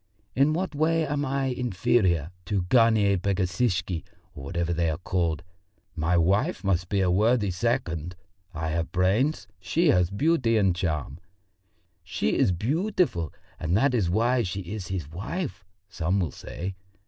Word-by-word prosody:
In 140 +4 +4
what 185 +1 -2
way 160 +2 +2
am 145 0 -1
I 135 0 -1
inferior 95 - +1
to 100 - -1
a - - +2
Garnier 105 -1 +4
Pagesishky 95 - 0 0.3
or 70 - -9
whatever 85 +4 -1
they 85 -1 +1
are 80 - -2
called? 85 -3 -1 0.5
My 85 +2 +1
wife 100 - +1
must 90 -3 0
be 100 -1 +1
a 90 -1 +2
worthy 105 +1 +2
second 90 - -2 0.4
I 80 -2 -3
have 80 +1 -2
brains, 105 - +1
she 170 0 +1
has 90 -2 +3
beauty 120 - +2
and 95 -4 +3
charm. 80 -5 -2 0.8
'She 80 -5 -1
is - - +3
beautiful, 135 - 0 0.3
and 85 +4 +1
that 135 +3 +3
is 105 -8 +1
why 120 +6 +2
she 95 -2 -3
is 95 +1 -6
his 90 -6 -4
wife,' 95 - -5 0.2
some 95 -1 -1
will 85 -7 -1
say. 95 +2 -6
95 Hz, 155 wpm, -26 LUFS, 85-125 Hz, 0.8 s, In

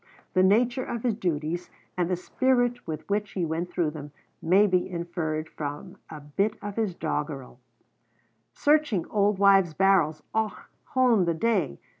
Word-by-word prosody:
The 185 - +4
nature 240 +7 +3
of 235 -2 -5
his 240 -3 +2
duties, 175 -4 -2 0.3
and 180 -1 0
the 185 - +1
spirit 245 +5 0
with 155 -1 -5
which 205 0 -1
he 180 -3 -1
went 165 +2 -3
through 170 -3 0
them, 145 -1 -9 0.3
may 190 +5 +5
be 185 -2 +1
inferred 170 -3 -3
from 150 +5 -6
a 155 - -8
bit 195 +9 -1
of 205 -1 -6
his 215 -6 -1
doggerel: 150 -6 -4 0.9
"Searching 295 - +2
auld 205 -1 +1
wives' 195 -4 +4
barrels, 165 -5 +3
Och, 220 -1 0 0.4
hone, 245 -7 +4
the 170 -1 0
day! 195 - 0
185 Hz, 155 wpm, -26 LUFS, 160-210 Hz, 0.9 s, may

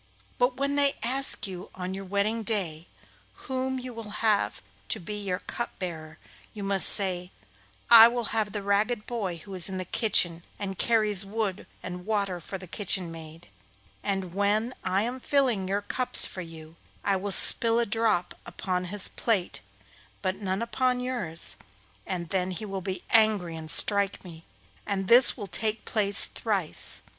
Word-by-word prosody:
But 250 +1 +1
when 280 +1 -1
they 280 -1 +3
ask 265 +2 -1
you 185 -2 -7
on 185 0 -5
your 195 0 -6
wedding 200 +4 0
day 180 -7 -2 0.6
whom 260 -1 -2
you 255 -1 -7
will 225 -2 -8 0.2
have 210 -2 +1 0.3
to - - -1
be 185 +4 -7
your 200 -3 -3
cup 235 - -5
bearer, 160 -4 -7 0.4
you 205 - -6
must 195 -1 +4
say, 180 -3 0 0.6
"I 230 -1 +10
will 240 0 -2
have 215 -2 0
the 205 -1 -5
ragged 210 +3 0
boy 200 -8 -4
who 195 +4 -11
is 185 -1 -2
in 190 - -5
the 185 - -4
kitchen, 175 -5 +2
and 195 -2 -5
carries 215 -4 +1
wood 200 -1 -3 0.2
and 180 0 -6
water 200 -4 -1
for 195 +4 -7
the 185 - -10
kitchen 185 -1 -2
maid;" 160 -2 -11 0.5
and 195 -3 -3
when 210 +5 0
I 195 +2 0
am 245 +3 -4
filling 250 -9 +1
your 200 +2 -1
cups 255 +4 +2
for 185 - -6
you, 165 -1 -11 0.3
I 200 - +1
will 195 +2 -3
spill 230 +4 +7
a 235 - +2
drop 215 -5 0
upon 180 -1 -3
his 195 +2 -2
plate 205 -7 -2 0.6
but 185 0 -1
none 195 +1 -2
upon 250 +2 0
yours, 240 -11 0 0.5
and 175 -3 -4
then 185 0 -1
he 190 +4 -5
will 195 -2 -5
be 190 0 -5
angry 215 -7 +3
and 160 -1 -7
strike 200 +3 +3
me, 165 -3 -12 0.4
and 195 -2 -3
this 245 +5 +6
will 210 - -5
take 215 +3 -3
place 205 -2 +6
thrice. 195 -8 -4
200 Hz, 170 wpm, -27 LUFS, 185-225 Hz, 0.6 s, I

